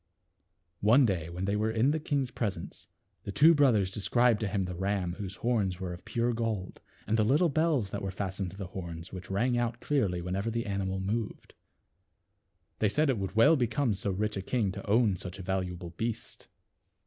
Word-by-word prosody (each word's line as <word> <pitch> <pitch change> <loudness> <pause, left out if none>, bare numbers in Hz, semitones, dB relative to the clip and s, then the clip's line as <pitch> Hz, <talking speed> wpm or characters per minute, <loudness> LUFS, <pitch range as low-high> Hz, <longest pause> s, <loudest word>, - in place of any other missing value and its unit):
One 120 +6 +5
day, 85 -7 -1
when 90 +2 -4
they 100 +1 0
were 110 +1 +1
in 115 +5 +2
the 160 - 0
king's 140 -5 -1
pres 105 -6 -2
ence, 85 - -10 0.3
the - - -6
two 160 +10 +6
brothers 120 - +3
described 120 +3 +2
to 110 - -1
him 100 0 0
the 90 0 -4
ram 95 -1 -1
whose 100 -1 -5
horns 105 -7 0
were 90 -2 -4
of 90 - -11
pure 120 +1 0
gold, 110 -5 -3 0.2
and 110 +2 +1
the 110 - +4
little 145 +10 +3
bells 150 - +1
that - - -3
were 95 - -2
fastened 95 0 -3
to 95 - -12
the 100 - -4
horns, 85 -1 -7
which 95 -1 -8
rang 120 +5 +1
out 120 0 -1
clearly 105 -14 0
whenever 95 +5 -2
the 115 +1 -2
animal 95 -2 -2
moved. 105 +3 -3 1.3
They 105 - +3
said 150 +5 +2
it 120 - -2
would 95 +1 -4
well 145 +9 +6
become 125 -2 +1
so 100 +1 -2
rich 105 +3 -1
a 95 - -2
king 105 -1 0
to - - -8
own 105 -3 +3
such 90 0 -7
a 95 - -7
valuable 90 -2 -3
beast. 110 +6 -5
105 Hz, 205 wpm, -30 LUFS, 95-120 Hz, 1.3 s, two